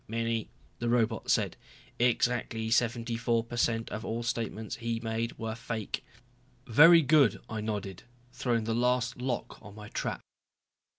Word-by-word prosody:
"Many," 115 0 -2 0.3
the 120 - -1
robot 115 -2 +1
said. - - +1 0.4
"Exactly 120 -2 +1
seventy 115 0 +1
four 115 0 +1
per 115 +1 -8
cent 115 -1 0
of 110 - -4
all 115 0 -3
statements 115 -1 -3
he 115 -1 -2
made 115 0 -3
were 110 0 -3
fake." 115 -2 -4 0.6
"Very 165 +8 +7
good," 145 -4 +4
I 110 -1 -4
nodded, 105 -3 -4 0.3
throwing 120 -3 0
the 115 +1 -1
last 125 +1 +1
lock 125 -1 -3
on 105 -1 -12
my 105 -1 -10
trap. - - -3
115 Hz, 145 wpm, -30 LUFS, 110-120 Hz, 0.6 s, Very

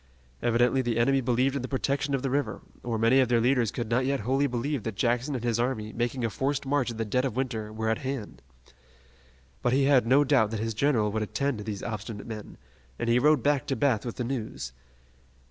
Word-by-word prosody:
Evidently 120 +2 +3
the 120 -2 -1
enemy 135 +3 +3
believed 125 +2 +1
in 140 - -1
the 130 - -4
protection 140 +1 0
of 135 - -3
the 135 - 0
river, 140 +1 -1 0.2
or 120 -2 -2
many 115 +4 +4
of 130 - +4
their 120 -1 +4
leaders 120 -1 +2
could 120 +1 -4
not 115 +3 +1
yet 135 -1 0
wholly 135 +6 +1
believe 130 +2 -2
that 110 -1 -4
Jackson 125 +5 0
and 120 - -4
his 120 -1 0
army, 115 -3 -1
making 120 +1 -1
a - - 0
forced 135 +4 -1
march 135 -2 +1
in 115 - -6
the 115 - -1
dead 125 +5 0
of 130 -5 -2
winter, 115 -5 -2
were 110 +1 -3
at 110 0 +1
hand. 130 - -5 1.2
But 120 - +1
he 135 +1 +3
had 135 -4 +4
no 135 +4 +5
doubt 130 -7 +3
that 110 -1 -3
his 115 +1 -2
general 110 -3 +2
would 110 +1 -1
attend 140 +3 -1
to - - -5
these 100 -2 -5
obstinate 105 -1 -5
men, 110 -2 -8 0.4
and 120 - -2
he 120 - +4
rode 150 -1 +4
back 145 -2 +1
to 135 - 0
Bath 125 -3 +1
with 120 - -5
the 125 - -3
news. 115 - -4
120 Hz, 230 wpm, -27 LUFS, 115-135 Hz, 1.2 s, no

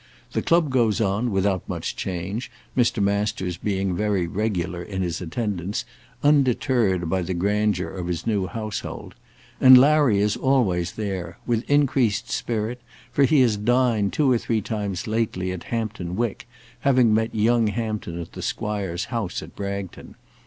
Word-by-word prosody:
The - - -1
club 165 -4 +2
goes 115 -5 +2
on 105 +3 +1
without 95 -2 0
much - - -3
change, 95 +6 -4 0.3
Mr. 120 -4 +2
Masters 100 -3 -1
being 95 -1 -1
very 105 -2 0
regular 90 -2 -2
in 95 +1 -4
his 85 0 -3
attendance, 100 0 -3 0.4
undeterred 125 - +2
by 95 +3 0
the 90 +1 -3
grandeur 100 0 0
of 90 -2 -5
his 85 -2 -3
new 105 -5 0
household. 110 0 -5 0.5
And 130 0 +9
Larry 140 -4 +5
is 105 +1 +2
always 100 -11 +1
there, 100 -3 -4
with 120 -1 -1
increased 130 -7 +2
spirit, 115 +2 -2 0.3
for 140 +3 +4
he 140 +1 +4
has 115 -4 +3
dined 115 -2 +2
two 145 -4 +2
or 120 - +3
three 115 -1 0
times 100 -4 -3
lately 110 -5 -1
at 90 -2 -6
Hampton 110 -6 -3
Wick, 115 -1 -2 0.3
having 125 -5 +4
met 110 +1 0
young 115 +1 +3
Hampton 105 -6 -3
at 85 - -7
the - - -8
Squire's 100 -5 -2
house 115 -6 -2
at - - -12
Bragton. 100 -2 -6
105 Hz, 155 wpm, -24 LUFS, 95-120 Hz, 0.5 s, And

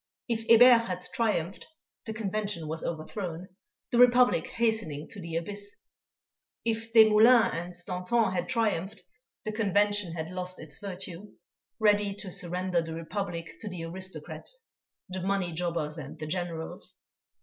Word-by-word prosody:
If 225 -2 -2
Hébert 230 0 +8
had 180 -1 -4
triumphed, 205 -6 -1 0.4
the 220 - -3
Convention 205 -5 -2
was 160 +1 -4
overthrown, 170 +2 -4 0.4
the 240 - +2
Republic 245 +1 +6
hastening 220 - -1
to 200 - -8
the 165 -1 -6
abyss; 205 +4 -3 0.9
if 225 0 -1
Desmoulins 225 +1 +7
and 175 +1 -4
Danton 190 +4 +1
had 180 -1 -2
triumphed, 210 -5 0 0.4
the 215 - -1
Convention 205 -3 +2
had 160 0 -4
lost 185 0 -4
its 155 -2 -7
virtue, 190 0 -6 0.4
ready 205 -2 +3
to 200 -2 -6
surrender 180 0 0
the 165 0 -6
Republic 170 0 -4
to 215 - -5
the 175 -3 -6
aristocrats, 190 - -5 0.4
the 185 0 -5
money 190 -1 0
jobbers 165 -2 -2
and 140 0 -8
the 155 - -5
Generals. 165 -1 -4
190 Hz, 140 wpm, -29 LUFS, 170-220 Hz, 0.9 s, Hébert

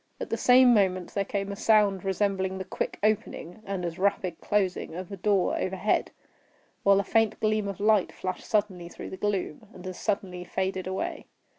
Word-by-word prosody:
At - - -6
the - - +2
same 250 0 +6
moment 185 -4 +1
there 200 - +1
came 200 0 -3
a - - -4
sound 205 -3 +3
resembling 190 -1 0
the 190 - -4
quick - - -3
opening, 215 -3 -1
and 190 -3 -3
as 170 0 -5
rapid 185 -3 0
closing 190 -5 -1
of 185 +2 -7
a - - -4
door 195 0 +1
overhead, 190 +3 0 0.7
while 200 0 +5
a - - +1
faint 220 +2 +1
gleam 215 -1 +1
of 200 -1 -5
light 210 -2 +3
flashed 185 0 -5
suddenly 185 -5 0
through - - -9
the 190 - -6
gloom, 205 -1 -2
and 180 - -11
as 185 -1 -6
suddenly 190 -4 -2
faded 190 +1 -2
away. 190 +1 -4
195 Hz, 185 wpm, -27 LUFS, 185-210 Hz, 0.7 s, same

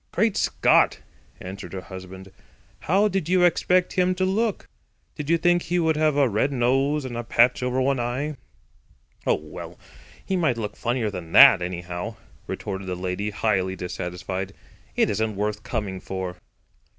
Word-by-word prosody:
"Great 215 +2 +1
Scott!" - - +3 0.4
answered 95 +2 -8
her 95 - -4
husband. 95 +1 -10 0.5
"How 195 +5 +2
did 195 -5 -2
you 185 0 +4
expect 180 +1 +3
him 185 0 +2
to 185 0 0
look? 210 +3 -1 0.5
Did 150 -1 -6
you 170 - +4
think 175 +1 +3
he 175 +2 -1
would 160 -2 +2
have 155 -1 +2
a 140 -2 +4
red 115 +6 0
nose 135 +3 +1
and 125 -2 -5
a 120 - -3
patch 120 +2 +3
over 125 +1 0
one 135 0 +1
eye?" 130 +6 -2 0.9
"Oh, - - +4
well, - - -9 0.5
he 190 - -1
might 155 -10 +1
look 105 -2 -4
funnier 120 -3 -1
than 90 -4 -8
that, - - +9
anyhow," 90 +4 -5 0.3
retorted 95 -1 -5
the 90 - -2
lady, 90 +3 -3
highly 100 -3 0
dissatisfied. 95 +2 -5 0.4
"It - - +3
isn't 110 +1 -1
worth 105 +1 -2
coming 105 -6 -4
for." 95 -1 -5
120 Hz, 165 wpm, -24 LUFS, 95-155 Hz, 0.9 s, that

